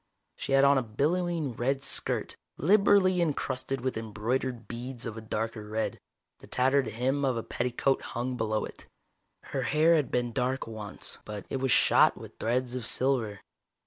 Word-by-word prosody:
She 135 - -3
had 135 0 +6
on 140 -1 +6
a - - 0
billowing 155 +5 -1
red 135 +4 -1
skirt, - - 0 0.2
liberally 190 +1 +4
encrusted 135 -4 -1
with 130 -2 -2
embroidered 115 +2 -2
beads 120 +1 -5
of 115 - -4
a 110 - -7
darker 110 0 -3
red. 110 +1 -2 0.4
The - - -14
tattered 135 0 +2
hem 130 +6 -1
of 130 -3 +1
a 115 - -3
petticoat 125 +2 0
hung 125 +2 -3
below 110 -2 -1
it. - - -12 0.7
Her 135 - 0
hair 155 +7 +4
had 150 -4 +1
been 120 -1 0
dark 130 +2 -1
once, 110 -2 -4
but 105 -1 -7
it - - 0
was 130 -1 0
shot - - +5
with - - -12
threads 125 +2 0
of 125 -3 -1
silver. 120 -6 0
125 Hz, 170 wpm, -29 LUFS, 115-135 Hz, 0.7 s, had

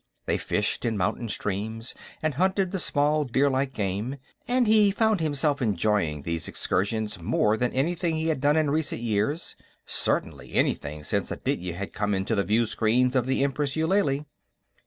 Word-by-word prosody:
They - - 0
fished - - -1
in 115 -2 0
mountain 100 +5 -1
streams, 110 +3 -3 0.3
and 155 -1 +1
hunted 190 +4 +1
the 195 - -2
small 150 -1 +1
deerlike 135 +1 +1
game, 105 +4 -2 0.3
and 250 0 +3
he 215 -2 +5
found 220 0 +2
himself 145 -2 +1
enjoying 100 - 0
these 85 0 -3
excursions 105 0 -1
more 105 +5 +2
than 125 +2 0
anything 165 +5 0
he 160 0 -1
had 150 -5 -1
done 145 +2 +3
in 155 -2 +2
recent 155 -5 -1
years; 115 +8 -1 0.3
certainly - - -1
anything 75 +1 0
since - - -1
Aditya 90 -1 -3
had 95 +2 -6
come 105 -1 0
into 95 +4 -1
the 100 -2 +2
viewscreens 115 +4 +2
of 125 -1 +2
the 135 +1 +1
Empress 140 0 -1
Eulalie. 160 -3 +1
130 Hz, 160 wpm, -26 LUFS, 105-155 Hz, 0.3 s, he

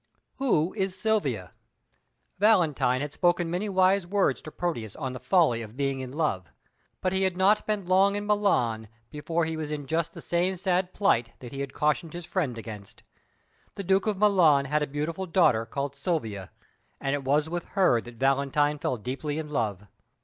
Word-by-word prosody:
"Who 185 - +1
is 190 -3 -2
Silvia?" 140 - -1 0.9
Valentine 165 - +3
had 145 0 -4
spoken 175 -1 +1
many 190 +4 -2
wise 190 -1 +3
words 200 +1 +1
to 155 - -9
Proteus 120 - -3
on 130 -2 -4
the 130 - -6
folly 155 -11 +3
of 110 +2 -10
being 135 -1 -1
in 130 -1 -6
love, 130 - -1 0.5
but 185 0 0
he 190 - +1
had 190 -2 0
not 200 +3 +3
been 210 -3 -1
long 190 +2 +4
in 205 0 -3
Milan 125 - +1 0.2
before 165 +3 -1
he 160 0 -3
was 155 -1 -4
in 150 -2 -4
just 160 +3 -1
the - - -9
same 180 +2 0
sad 185 0 0
plight 120 - +1
that 120 -2 -10
he 140 - -7
had 140 -1 -4
cautioned 150 +2 0
his 175 -1 -7
friend 150 -12 -2
against. 105 -3 -9 0.7
The 200 - -5
Duke 190 +2 +2
of 210 -2 0
Milan 180 -9 +4
had 150 +3 0
a 150 - 0
beautiful 160 +6 -3
daughter 130 -11 +3
called 140 0 -4
Silvia, 115 - -3 0.5
and 135 - -1
it 145 -1 -2
was 145 +3 +2
with 175 +1 -4
her 150 -12 +4
that 120 +1 -12
Valentine 140 +3 +1
fell 130 - -1
deeply 135 +6 -4
in 155 -1 -4
love. 105 -8 -2
155 Hz, 185 wpm, -27 LUFS, 130-185 Hz, 0.9 s, long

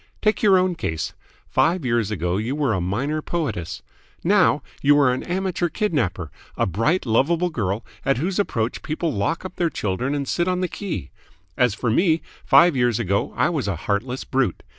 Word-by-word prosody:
Take 215 0 +1
your 200 -3 +6
own 185 0 +2
case. 80 - -3 0.3
Five 165 -2 +1
years 115 -4 +1
ago 90 -3 -1
you 115 +6 -2
were 145 -6 +1
a 95 - -1
minor 130 - -1
poetess. 95 - -3 0.4
Now 180 -6 +3 0.2
you 145 +1 +5
are 135 -3 +4
an 130 - -3
amateur 180 -1 -1
kidnapper 125 - -1 0.3
a - - +2
bright, 115 - 0
lovable 165 +10 +2
girl 105 - -2 0.2
at 135 -2 +2
whose 180 +8 -1
approach 115 - -1
people 160 +1 -2
lock 140 - -1
up 185 - -8
their 170 -2 +1
children 125 +2 -2
and 140 -2 -2
sit 175 +5 0
on 180 0 0
the 185 - +1
key. 180 - -5 0.4
As 125 -4 +2
for 115 0 -1
me, 160 - +2 0.2
five 170 -2 +6
years 120 -3 +2
ago 100 -3 0
I - - +3
was 150 -10 -2
a 100 - -1
heartless 125 +6 -1
brute. 130 -9 -1
135 Hz, 185 wpm, -23 LUFS, 110-175 Hz, 0.4 s, your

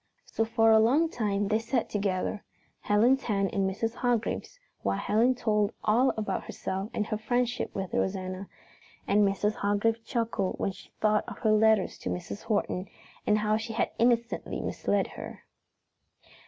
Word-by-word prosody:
So 225 - -1
for 225 0 +3
a 220 - +7
long 280 +9 +4
time 205 -6 -1
they 215 +1 +2
sat 230 +1 -1
together, 200 0 -2 0.4
Helen's 240 +6 +3
hand 200 -5 0
in 195 -4 +1
Mrs. 225 +4 -2
Hargrave's 245 - -1 0.2
while - - 0
Helen 225 +5 +2
told 210 -3 +1
all 240 +5 +4
about 210 -3 -2
herself 195 +2 -4
and 210 - -1
her 215 0 -3
friendship 245 +2 -1
with 190 -3 -4
Rosanna, 185 0 -2 0.6
and 210 - +4
Mrs. 205 +2 +1
Hargrave 215 +3 +1
chuckled 225 -5 -1
when - - -1
she - - -14
thought 215 0 +3
of - - -8
her 220 - +1
letters 215 -1 +3
to - - -4
Mrs. 180 +3 -5
Horton 205 -3 -1 0.4
and 210 - +4
how 215 0 +1
she 225 +1 -5
had 225 - 0
innocently 235 0 +1
misled - - 0
her. - - -9
215 Hz, 160 wpm, -28 LUFS, 200-230 Hz, 0.6 s, a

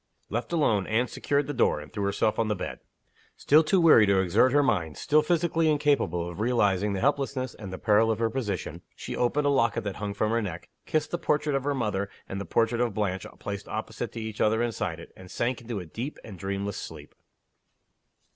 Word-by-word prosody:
Left 120 +7 -3
alone, 115 - +2
Anne 115 +3 +1
secured 145 +2 0
the 145 - -4
door, 125 - +2
and - - -12
threw 100 -2 -2
herself 100 +2 0
on 115 - +2
the 105 - 0
bed. - - -5 0.6
Still 155 +3 +5
too 185 +5 +2
weary 155 -11 +7
to 100 -1 +4
exert 95 +8 +3
her 145 +1 +4
mind, 85 - 0
still 155 +1 +3
physically 165 0 +1
incapable 140 - +1
of 85 +2 -8
realizing 105 -4 +2
the 95 - -2
helplessness 135 -1 0
and 100 -4 -9
the 95 - -5
peril 110 +3 +3
of 110 - +1
her 115 0 0
position, 100 - -3
she - - -6
opened 140 +4 +1
a 145 - +3
locket 115 -5 +2
that 100 -2 -4
hung 100 0 -4
from 105 +1 0
her 115 0 +1
neck, 90 -5 -6 0.2
kissed 155 -1 0
the 175 - -2
portrait 150 -3 0
of 135 0 -1
her 145 -1 0
mother 105 -5 -1 0.2
and 100 +1 -4
the - - -5
portrait 115 +6 +1
of 120 -5 0
Blanche 95 -3 -2
placed 100 0 -6
opposite 110 +2 -4
to 115 - -5
each 110 -1 -5
other 110 +2 +3
inside 95 -8 -2
it, 85 - -12
and 95 -1 -13
sank 120 +3 -2
into 115 -3 -4
a 90 - -7
deep 120 - -6
and 100 -5 -10
dreamless 100 +1 -3
sleep. - - -9
110 Hz, 220 wpm, -27 LUFS, 100-135 Hz, 0.6 s, weary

